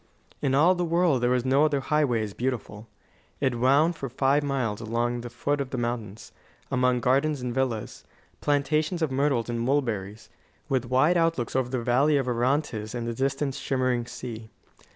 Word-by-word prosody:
In 135 -1 +1
all 165 +6 +5
the 180 -1 -2
world 170 -5 +2
there 120 - +2
was 125 0 +1
no 135 +3 +4
other 150 -2 +2
highway 135 -5 +1
as 105 -2 -5
beautiful. 115 -4 -4 0.5
It 130 -4 0
wound 140 +7 +4
for 135 -5 -5
five 135 +3 +2
miles 130 -7 -2
along 120 +2 -1
the 120 - -7
foot 140 +4 -1
of 135 - -4
the 130 - -4
mountains, 115 -3 -4 0.4
among 125 -1 +2
gardens 140 +4 +2
and 125 -1 -3
villas, 125 -4 -2 0.4
plantations 150 +4 0
of 155 - 0
myrtles 135 -3 +1
and 120 -1 -2
mulberries, 115 -6 -2 0.4
with 130 -2 0
wide 135 +8 +3
outlooks 165 -9 0
over 130 -2 +1
the 125 -2 -2
valley 135 +5 +3
of 135 -2 -1
Orontes 120 -2 -1
and 120 -1 -3
the 120 - -2
distant, 135 +3 -1
shimmering 130 -3 -1
sea. 115 -3 -8
130 Hz, 175 wpm, -26 LUFS, 120-145 Hz, 0.5 s, all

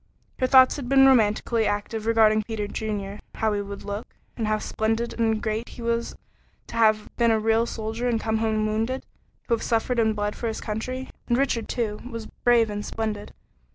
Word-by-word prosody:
Her 255 - +2
thoughts 260 +1 +6
had 255 -4 -5
been 270 0 +6
romantically 225 -2 +3
active 210 +2 -2
regarding 220 -1 +4
Peter 215 -1 -4
Junior, 205 -1 -4 0.2
how 220 -1 +1
he 205 - -1
would 200 0 -7
look, 205 +2 -6 0.2
and 225 -3 -2
how 215 0 +2
splendid 225 +2 -2
and 225 -1 +2
great 220 +1 -2
he 235 - -9
was 235 0 -1 0.5
to - - -10
have 215 -2 +2
been 235 -1 +4
a 220 -1 +3
real 225 +1 +2
soldier 225 +2 -3
and 230 -2 +1
come 220 0 0
home 220 -1 +1
wounded 225 +5 -1 0.4
to 235 - +1
have 230 - 0
suffered 235 +1 0
and 220 -1 +2
bled 205 0 -2
for 235 - -3
his 220 - -3
country. 255 +5 -4 0.2
And 240 - +2
Richard, 250 -5 0
too, 215 -4 -2
was 230 -2 -6
brave 235 -2 +2
and 205 0 -4
splendid. 215 -2 -4
225 Hz, 195 wpm, -25 LUFS, 215-235 Hz, 0.5 s, thoughts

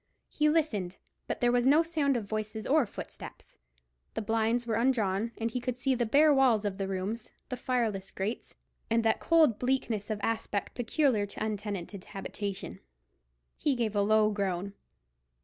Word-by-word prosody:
He 300 0 +2
listened, 215 - 0 0.3
but - - -3
there 240 0 +4
was 245 0 +3
no 300 +4 +6
sound 300 -5 +1
of 220 - -4
voices 215 +1 -4
or 290 -4 +3
footsteps. - - -10 0.6
The - - -1
blinds 225 +2 +1
were 230 - -1
undrawn, 225 -3 +1
and 230 0 -2
he 250 - -2
could 245 0 -3
see 260 +1 +1
the 240 -2 0
bare 295 +5 +5
walls 250 -6 +4
of 200 -1 -2
the 195 - -1
rooms, 195 +5 -3 0.2
the 250 - -2
fireless 225 -7 -1
grates, 205 +5 -4 0.3
and 230 0 +2
that 220 - +3
cold 315 -10 +4
bleakness 245 -5 -1
of 215 -1 -2
aspect 220 -3 -2
peculiar 245 -3 +1
to - - -10
an 220 - 0
untenanted 200 -2 -5
habitation. 195 - -5 0.8
He 290 -3 +1
gave 225 -3 -1
a 205 - +3
low 215 +1 +4
groan. 195 -1 -2
225 Hz, 170 wpm, -30 LUFS, 205-250 Hz, 0.8 s, no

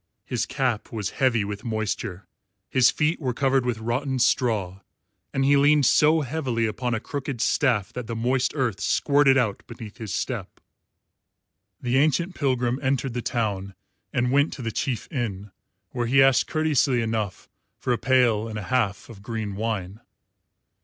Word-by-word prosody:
His - - -2
cap 125 -5 -1
was 105 -3 -3
heavy 120 -6 +3
with 100 0 -6
moisture, 110 -4 -3 0.5
his 130 -2 +5
feet 155 +2 0
were 125 -4 -2
covered 135 -2 +1
with 120 -2 0
rotten 130 +4 -2
straw, 105 -7 +1 0.5
and 135 -1 0
he 140 +1 +5
leaned 145 0 +4
so 155 +5 +4
heavily 130 -5 -1
upon 120 +2 -2
a - - -2
crooked 140 0 -5
staff 115 -5 +1
that 125 -2 -6
the 115 - -4
moist 125 +3 0
earth 120 -8 -1
squirted 140 -2 +3
out 110 -6 0
beneath 115 -3 -10
his 110 -4 -6
step. - - -4 1.2
The 125 +1 0
ancient 165 +5 +1
pilgrim 125 -4 0
entered 135 -2 0
the 120 - -2
town 100 -5 -2 0.4
and 125 -1 0
went 145 +3 +3
to 130 - -7
the 115 - -2
chief 120 -1 -2
inn, 105 -7 -4 0.4
where 120 -2 -2
he 135 +2 +5
asked 135 -2 +4
courteously 150 -5 +2
enough 110 -4 -3 0.3
for 125 - -1
a 120 - -2
pail 120 -4 +3
and 110 -1 -5
a 105 - -4
half 105 -6 0
of 110 -5 -12
green 110 -2 -4
wine. 105 -2 -3
120 Hz, 165 wpm, -25 LUFS, 110-135 Hz, 1.2 s, his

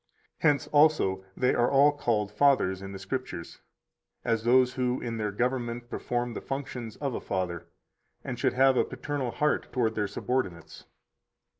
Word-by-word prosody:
Hence 145 -3 +3
also 145 -11 +3
they 125 - +2
are 120 +1 +2
all 140 +2 +5
called 110 -8 -1
fathers 105 -6 +3
in 95 0 -7
the 100 - -6
Scriptures, 95 -3 -5 0.6
as 115 -1 +1
those 125 +1 +4
who 125 -1 0
in 115 -1 -4
their 105 -2 -1
government 120 +1 -2
perform 120 0 -2
the - - -5
functions 130 -5 -5
of 140 -3 -3
a - - -4
father, 90 -2 -3 0.6
and 125 -2 -5
should - - +1
have 130 0 +4
a - - +4
paternal 145 -4 -4
heart 150 +5 0
toward 115 -4 +1
their 105 -2 -1
subordinates. 100 -5 -3
120 Hz, 160 wpm, -28 LUFS, 105-130 Hz, 0.6 s, all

